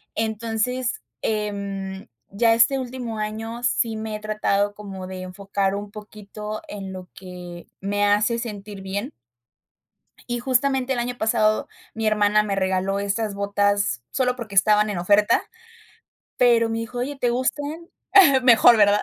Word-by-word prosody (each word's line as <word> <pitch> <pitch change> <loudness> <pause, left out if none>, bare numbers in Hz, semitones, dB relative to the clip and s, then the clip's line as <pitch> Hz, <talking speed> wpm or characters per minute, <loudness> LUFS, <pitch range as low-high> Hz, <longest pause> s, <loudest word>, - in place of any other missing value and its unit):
entonces, 225 +3 -1 0.2
em, 200 -2 -3 0.2
ya 225 +3 +3
este 235 +4 +4
último 245 -3 -5
año 220 +2 -4
sí 230 -2 +1
me 220 0 -4
he - - -5
tratado 205 -1 0
como 195 -3 -8
de 185 0 -7
enfocar 195 +1 -2
un 205 0 -6
poquito 210 0 -8
en 195 -2 -6
lo 185 -1 -9
que 180 -2 -10
me 205 +1 -1
hace 210 +3 +2
sentir 205 -3 -7
bien. 200 +7 -4 1.2
Y 240 0 -1
justamente 260 +1 +1
el 255 - 0
año 245 +1 -3
pasado, 215 -1 +1 0.2
mi 225 0 -3
hermana 210 0 +3
me 200 -2 -2
regaló 190 +1 0
estas 200 +1 -1
botas 200 - 0
solo 250 -2 +1
porque 220 -5 -8
estaban 210 +2 +4
en 205 - -3
oferta, 205 +4 +3 1.0
pero 235 -2 +4
me 225 - -2
dijo: 230 +2 -5
"Oye, 275 +3 -3
¿te 245 - +2
gustan?" 290 +6 -2 0.5
Mejor, 235 -1 +7
¿verdad? 205 0 +4
210 Hz, 145 wpm, -23 LUFS, 200-235 Hz, 1.2 s, Mejor